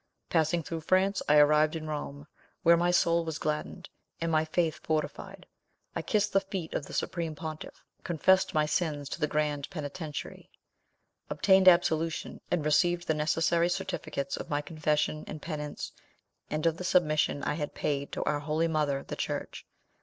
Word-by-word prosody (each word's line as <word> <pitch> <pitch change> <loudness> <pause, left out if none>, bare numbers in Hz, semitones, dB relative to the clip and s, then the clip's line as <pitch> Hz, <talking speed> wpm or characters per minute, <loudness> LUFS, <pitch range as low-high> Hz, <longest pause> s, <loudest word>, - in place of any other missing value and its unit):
Passing 165 0 +2
through 165 +2 -5
France, 190 +4 +2
I 150 - +6
arrived 150 +1 +5
in 160 -1 -5
Rome, 145 -2 -5 0.4
where 170 +1 +7
my 175 +1 +2
soul 170 -1 +3
was 160 -1 -4
gladdened, 155 +4 -3 0.3
and 165 0 -1
my 155 0 +3
faith 160 0 0
fortified. 155 -1 -3 0.5
I - - -1
kissed 210 -1 0
the 195 - +5
feet 190 -4 -5
of 140 - -3
the - - -10
supreme 165 -3 -2
pontiff, 155 0 -7 0.2
confessed 190 +3 +3
my 155 0 +3
sins 150 -2 -1
to - - -5
the 150 - +1
grand 150 -2 -1
penitentiary, 155 -2 -6 0.8
obtained 190 +5 +4
absolution, 165 -2 +3
and 165 -4 0
received 175 +3 +2
the 160 - +3
necessary 165 +3 +2
certificates 170 -7 -3
of - - -7
my 145 0 0
confession 155 0 -1
and 155 - -6
penance, 150 -2 -5 0.6
and 155 +1 -2
of 165 -1 +2
the 180 - -6
submission 155 -5 +2
I - - 0
had 150 -1 -4
paid 140 -1 -2
to - - -2
our 150 - 0
holy 155 +3 0
mother, 150 -4 0
the - - -6
church. - - -4
155 Hz, 170 wpm, -29 LUFS, 150-170 Hz, 0.8 s, where